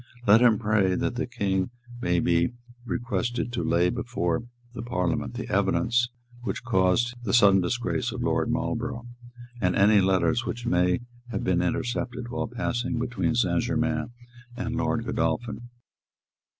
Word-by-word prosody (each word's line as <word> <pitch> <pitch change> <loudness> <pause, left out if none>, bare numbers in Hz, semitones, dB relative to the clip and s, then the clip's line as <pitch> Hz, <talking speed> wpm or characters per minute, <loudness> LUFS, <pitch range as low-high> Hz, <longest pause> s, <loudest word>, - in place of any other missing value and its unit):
Let 105 +3 +7
him 120 -3 +5
pray 105 -4 +2
that 120 - -1
the 120 +1 -2
King 95 -5 -1 0.3
may 90 -4 +2
be 85 +7 +2 0.3
requested 120 0 -2
to 120 - -1
lay 85 +1 +2
before 120 -9 -1 0.5
Parliament 90 -8 -1
the - - -5
evidence 120 +1 +2 0.3
which 120 - -4
caused 115 +2 +2
the 120 - +1
sudden 100 -5 +6
disgrace 120 +7 -1
of - - -4
Lord - - +1
Marlborough, 120 0 -2 0.6
and 90 -1 +2
any 100 +1 +5
letters 95 +6 +2
which 120 +1 -5
may 90 -2 +2 0.3
have - - -3
been 90 -1 +2
intercepted 120 +5 -2
while 120 - -2
passing 120 +1 -2
between 120 0 -1
Saint 90 -8 +2
Germains 115 - -1 0.5
and 120 -1 -3
Lord 120 -1 0
Godolphin. 115 +8 -2
115 Hz, 140 wpm, -26 LUFS, 90-120 Hz, 0.6 s, Let